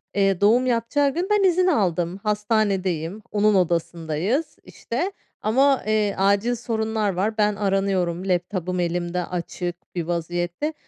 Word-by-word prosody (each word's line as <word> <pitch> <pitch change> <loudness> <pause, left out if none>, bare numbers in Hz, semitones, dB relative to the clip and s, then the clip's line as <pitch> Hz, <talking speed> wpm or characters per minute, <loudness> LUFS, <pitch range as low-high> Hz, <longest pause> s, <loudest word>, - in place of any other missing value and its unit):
Eee, 195 -2 +2
doğum 235 +5 +4
yapacağı 255 +4 +1
gün 355 +3 -1
ben 415 -1 +4
izin 365 0 +3
aldım, 180 - +1
hastanedeyim. 205 -4 0
Onun 210 0 +3
odasındayız, 175 - -1
işte, 335 +12 -4 0.3
ama, 270 +5 +3
eee, 210 -2 +1
acil 200 +5 +2
sorunlar 220 -3 -1
var 210 +5 -1
ben 210 -1 +2
aranıyorum, 195 -3 0
laptop'um 180 0 -1
elimde 175 0 -1
açık 175 0 -5
bir 170 - -1
vaziyette. 175 - -2
200 Hz, 125 wpm, -23 LUFS, 175-225 Hz, 0.3 s, doğum